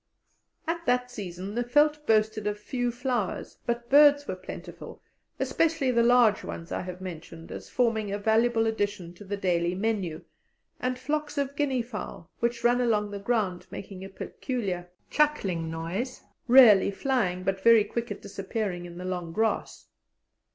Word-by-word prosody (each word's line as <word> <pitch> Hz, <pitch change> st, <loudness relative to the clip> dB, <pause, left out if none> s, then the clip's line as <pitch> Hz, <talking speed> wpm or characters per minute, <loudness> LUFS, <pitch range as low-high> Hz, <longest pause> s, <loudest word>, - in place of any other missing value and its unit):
At 335 Hz, 0 st, -2 dB
that 250 Hz, 0 st, +1 dB
season 190 Hz, -2 st, -6 dB
the 240 Hz, -, 0 dB
veldt 295 Hz, +4 st, +2 dB
boasted 215 Hz, -1 st, +2 dB
of 210 Hz, 0 st, -1 dB
few 245 Hz, +2 st, -2 dB
flowers, 245 Hz, -5 st, -3 dB
but 235 Hz, 0 st, -2 dB
birds 290 Hz, +1 st, +6 dB
were -, -, -2 dB
plentiful, -, -, -9 dB, 0.4 s
especially 320 Hz, -5 st, +1 dB
the 235 Hz, -1 st, +3 dB
large 235 Hz, -3 st, +4 dB
ones 165 Hz, -, -7 dB
I -, -, -2 dB
have 180 Hz, 0 st, -7 dB
mentioned 165 Hz, -2 st, -8 dB
as -, -, -8 dB
forming 225 Hz, -4 st, +1 dB
a 200 Hz, -, -1 dB
valuable 225 Hz, +2 st, +2 dB
addition 205 Hz, -5 st, -2 dB
to 180 Hz, -, -13 dB
the 200 Hz, +1 st, -4 dB
daily 175 Hz, -2 st, 0 dB
menu, 195 Hz, -5 st, -2 dB, 0.6 s
and 255 Hz, 0 st, -1 dB
flocks 295 Hz, +3 st, -3 dB
of 280 Hz, 0 st, -1 dB
guinea 270 Hz, -4 st, 0 dB
fowl, 210 Hz, -6 st, -8 dB
which 235 Hz, 0 st, -1 dB
run 245 Hz, +1 st, +4 dB
along 210 Hz, -4 st, +1 dB
the 200 Hz, -, -5 dB
ground 200 Hz, -4 st, -1 dB
making 190 Hz, -1 st, -8 dB
a 195 Hz, -, -7 dB
peculiar 195 Hz, -4 st, -4 dB, 0.2 s
chuckling 195 Hz, -, +1 dB
noise, 175 Hz, +11 st, -4 dB, 0.3 s
rarely 235 Hz, -7 st, +8 dB
flying, 200 Hz, -4 st, -1 dB
but 190 Hz, 0 st, -1 dB
very 230 Hz, 0 st, +7 dB
quick 235 Hz, +3 st, -4 dB
at -, -, -7 dB
disappearing 195 Hz, -2 st, -4 dB
in 170 Hz, 0 st, -11 dB
the 180 Hz, -, -6 dB
long 180 Hz, -2 st, -3 dB
grass. 220 Hz, +5 st, -1 dB
220 Hz, 160 wpm, -27 LUFS, 190-250 Hz, 0.6 s, rarely